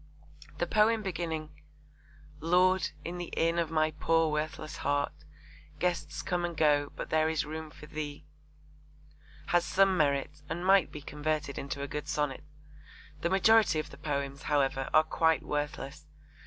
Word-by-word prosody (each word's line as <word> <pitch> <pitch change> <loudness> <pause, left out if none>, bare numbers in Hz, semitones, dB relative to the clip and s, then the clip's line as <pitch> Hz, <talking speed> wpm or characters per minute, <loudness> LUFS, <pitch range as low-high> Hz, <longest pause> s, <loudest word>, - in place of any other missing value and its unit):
The 175 - 0
poem 215 +4 +3
beginning 160 -4 -3 0.9
Lord, 180 +4 +3 0.2
in 175 +1 -4
the 175 - -5
inn 165 +1 +2
of 165 -2 0
my 155 -1 +2
poor 165 +1 +2
worthless 155 0 -3
heart 145 0 0 0.6
Guests 170 -4 -2
come 180 -1 -1
and 170 -2 -3
go; 145 -2 +3
but - - -6
there 155 0 +3
is 160 -2 0
room 155 +1 -6
for 150 - -13
Thee, 150 -1 -6 1.2
has 175 0 +4
some 195 +1 +3
merit 145 -2 0
and 170 +3 -3
might 190 -3 +5
be 150 - -8
converted 150 -1 -2
into 140 0 -4
a - - -3
good 150 +1 -5
sonnet. 150 -2 -1 0.8
The 170 - +1
majority 210 -2 +5
of 155 - -3
the - - -11
poems, 140 -2 -3
however, 135 -2 +1
are 155 - +6
quite 160 0 +2
worthless. 150 0 -4
155 Hz, 155 wpm, -30 LUFS, 150-170 Hz, 1.2 s, are